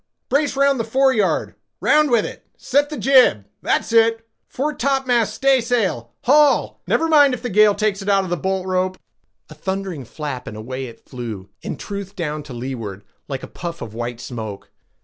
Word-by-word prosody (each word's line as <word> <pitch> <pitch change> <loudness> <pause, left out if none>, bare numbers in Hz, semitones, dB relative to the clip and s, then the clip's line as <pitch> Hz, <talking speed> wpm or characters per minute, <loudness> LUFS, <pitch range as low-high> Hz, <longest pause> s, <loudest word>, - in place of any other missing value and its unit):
"Brace 285 +1 +1
round 275 -1 +3
the - - +1
foreyard; 240 -3 +2 0.3
round 305 -1 +4
with 235 -4 +3
it—set 285 +2 -2
the 305 - -5
jib—that's 235 - +2
it—foretopmast 240 +2 +1
staysail—haul—never 255 - +2
mind 290 -4 +5
if 240 - -12
the 245 - -3
gale 210 +1 +5
takes 210 -1 0
it 195 - -3
out 195 -1 +4
of 185 - -6
the - - +2
bolt 190 +3 -2
rope"—a 185 0 -5
thundering 190 -7 -4
flap, 130 -1 -6
and 105 - -7
away 130 +4 -5
it 115 - -14
flew 115 -7 -7
in - - -5
truth 200 -1 -6
down 155 -3 -3
to 145 -2 -12
leeward, 115 -5 -6 0.2
like 135 -2 -5
a - - -6
puff 170 -1 -6
of 110 - -7
white 120 +1 -4
smoke. 110 -5 -7
195 Hz, 155 wpm, -21 LUFS, -, 0.3 s, mind